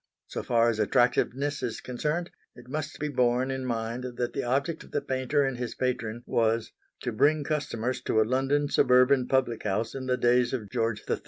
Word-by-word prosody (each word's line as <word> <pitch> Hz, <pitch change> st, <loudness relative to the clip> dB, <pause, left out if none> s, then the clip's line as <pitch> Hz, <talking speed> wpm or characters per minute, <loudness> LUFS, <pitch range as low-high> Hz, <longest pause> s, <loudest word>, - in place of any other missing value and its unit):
So -, -, -5 dB
far 115 Hz, -1 st, +3 dB
as 110 Hz, -, -4 dB
attractiveness 125 Hz, +6 st, +1 dB
is 120 Hz, -3 st, -3 dB
concerned, 150 Hz, +7 st, -3 dB, 0.2 s
it 125 Hz, -, -14 dB
must 150 Hz, +3 st, -4 dB
be 150 Hz, -, -2 dB
borne 125 Hz, -1 st, +1 dB
in 130 Hz, 0 st, -3 dB
mind 115 Hz, +1 st, -2 dB
that 120 Hz, 0 st, -2 dB
the -, -, -2 dB
object 140 Hz, +6 st, -1 dB
of -, -, -16 dB
the 145 Hz, -, -1 dB
painter 130 Hz, +2 st, 0 dB
and 135 Hz, -2 st, -2 dB
his 125 Hz, -1 st, -4 dB
patron 120 Hz, -2 st, -2 dB
was 115 Hz, 0 st, +1 dB, 0.3 s
to 120 Hz, -, -2 dB
bring 145 Hz, +7 st, +3 dB
customers 130 Hz, -5 st, -2 dB
to 110 Hz, -, +2 dB
a -, -, +6 dB
London 135 Hz, +4 st, +1 dB
suburban 125 Hz, 0 st, +4 dB
public 130 Hz, -4 st, +1 dB
house 105 Hz, +3 st, -1 dB
in 130 Hz, -1 st, -5 dB
the 125 Hz, 0 st, +1 dB
days 120 Hz, 0 st, +3 dB
of 110 Hz, -6 st, -4 dB
George 115 Hz, -3 st, -1 dB
III. -, -, 0 dB
125 Hz, 195 wpm, -28 LUFS, 115-135 Hz, 0.3 s, a